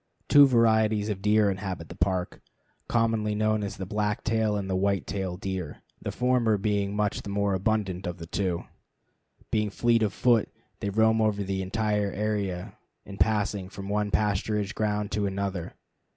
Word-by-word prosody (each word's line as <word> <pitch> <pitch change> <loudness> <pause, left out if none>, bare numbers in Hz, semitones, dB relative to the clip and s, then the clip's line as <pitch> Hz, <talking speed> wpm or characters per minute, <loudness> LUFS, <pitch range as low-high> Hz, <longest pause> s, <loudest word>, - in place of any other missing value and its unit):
Two 145 -1 +8
varieties 110 -3 +3
of 100 -2 -3
deer 105 0 +3
inhabit 95 -4 -5
the - - -8
Park, 90 -2 -1 0.5
commonly 115 -2 +1
known 110 0 +1
as 100 - -4
the 95 - -4
black 105 +1 -1
tail 110 -2 +1
and 100 -1 -3
white 95 +1 +1
tail 95 -3 -3
deer, 95 -5 -5 0.2
the - - -3
former 125 -4 +2
being 100 0 -1
much 105 -1 0
the - - -8
more 100 0 0
abundant 95 -1 -1
of 90 +1 -4
the 85 - -8
two. 90 0 -2 0.9
Being 105 -1 +1
fleet 115 +2 +2
of 105 -3 +2
foot, 120 -2 +2 0.3
they 100 - -2
roam 110 +2 +3
over 105 -2 +1
the 95 0 -2
entire 105 +1 0
area 100 -4 -3 0.3
in 100 0 -9
passing 100 -2 +1
from 100 0 -8
one 105 0 0
pasturage 105 0 0
ground 105 -1 -1
to 105 -1 0
another. 95 -3 -3
105 Hz, 165 wpm, -27 LUFS, 95-110 Hz, 0.9 s, Two